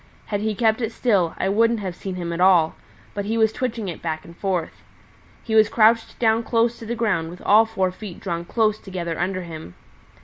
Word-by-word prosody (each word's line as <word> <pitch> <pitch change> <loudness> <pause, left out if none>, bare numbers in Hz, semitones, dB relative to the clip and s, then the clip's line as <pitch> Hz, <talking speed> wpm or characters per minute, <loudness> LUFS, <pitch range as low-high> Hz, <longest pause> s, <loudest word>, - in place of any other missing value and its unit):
Had 205 -1 -2
he 215 0 -1
kept 220 +2 +2
it 225 -1 -1
still 200 -9 +1
I - - -1
wouldn't 230 +3 +2
have 185 -4 -5
seen 190 0 -6
him 170 -2 -4
at 170 - -3
all; 180 -4 +5 0.4
but 205 -1 -3
he 225 +2 -1
was 220 -1 +3
twitching 235 -5 -3
it 170 - -6
back 155 -2 -4
and 170 - -13
forth. 180 -3 -3 0.6
He 225 - -4
was 220 -1 +5
crouched 225 0 +3
down 225 -1 +2
close 230 0 +1
to 225 - -9
the 235 - -2
ground 200 -9 0
with 175 +1 -11
all 220 +2 +5
four 190 -4 0
feet 185 -1 -9
drawn 170 -3 -3
close 215 +3 +1
together 175 -4 -5
under 185 +1 -1
him. 160 - -9
205 Hz, 215 wpm, -22 LUFS, 175-225 Hz, 0.6 s, all